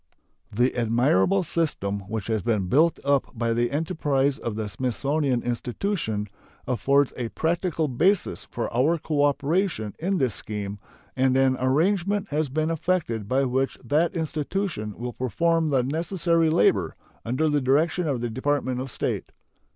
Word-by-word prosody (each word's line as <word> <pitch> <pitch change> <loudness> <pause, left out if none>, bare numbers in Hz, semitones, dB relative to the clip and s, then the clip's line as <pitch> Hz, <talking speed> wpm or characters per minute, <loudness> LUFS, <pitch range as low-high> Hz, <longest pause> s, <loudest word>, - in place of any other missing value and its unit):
The 120 +5 +1
admirable 120 - +2
system 125 - -1
which 110 -2 -3
has 110 -2 -1
been 105 -1 0
built 155 - +3
up 140 -3 +1
by 115 0 0
the 120 +1 +1
enterprise 145 -3 0
of 115 -3 -4
the 110 -1 -3
Smithsonian 130 +4 -1
Institution 120 - -2 0.4
affords 135 +3 +2
a 120 -2 -3
practical 165 +1 -1
basis 180 +10 +1
for - - -4
our 150 +8 +3
cooperation 145 - 0
in 190 +4 0
this 130 - +1
scheme, 105 -1 -5 0.4
and 130 0 +2
an 135 -1 +3
arrangement 190 +9 +1
has 150 0 0
been 155 +4 0
effected 155 - -1
by 135 +2 +2
which 130 +1 0
that 155 +9 +1
institution 155 - -3
will 120 +1 -5
perform 165 - +1
the 135 -3 +2
necessary 165 +3 +1
labor, 100 - +2 0.3
under 130 +7 0
the 150 -1 +2
direction 155 +6 +2
of 135 -5 -1
the 120 - -2
Department 130 0 -1
of 135 - -5
State. - - -3
135 Hz, 145 wpm, -25 LUFS, 120-160 Hz, 0.4 s, built